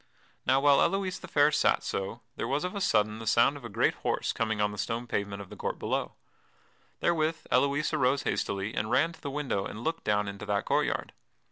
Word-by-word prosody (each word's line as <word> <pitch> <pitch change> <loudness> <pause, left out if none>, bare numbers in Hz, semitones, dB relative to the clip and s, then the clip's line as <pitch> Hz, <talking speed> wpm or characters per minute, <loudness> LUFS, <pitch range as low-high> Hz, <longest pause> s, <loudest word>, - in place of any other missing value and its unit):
Now 135 - +5
while 140 0 +5
Elouise 195 -1 0
the - - -9
Fair 145 0 +4
sat 150 - +2
so, 100 +5 -4
there - - -3
was 140 +5 0
of 180 - -3
a 200 - -4
sudden 110 - +2
the 115 - -7
sound 120 +6 +4
of 145 - -10
a 120 - -6
great 100 - +2
horse - - 0
coming 110 -2 -1
on 105 0 +2
the 105 - -8
stone 115 +5 -2
pavement 100 -3 -3
of 95 - -16
the - - -8
court - - -3
below. - - -2 0.9
Therewith 160 -1 +1
Elouise 140 +4 +2
arose 135 -2 +2
hastily 100 +2 -1
and 110 - -2
ran 165 +7 +2
to - - -17
the 145 - -4
window 135 -8 -1
and 105 +4 -7
looked 165 +1 -2
down 105 -1 +1
into 100 +1 -7
that 100 -1 0
court - - +2
yard. - - -3
120 Hz, 225 wpm, -29 LUFS, 105-150 Hz, 0.9 s, Now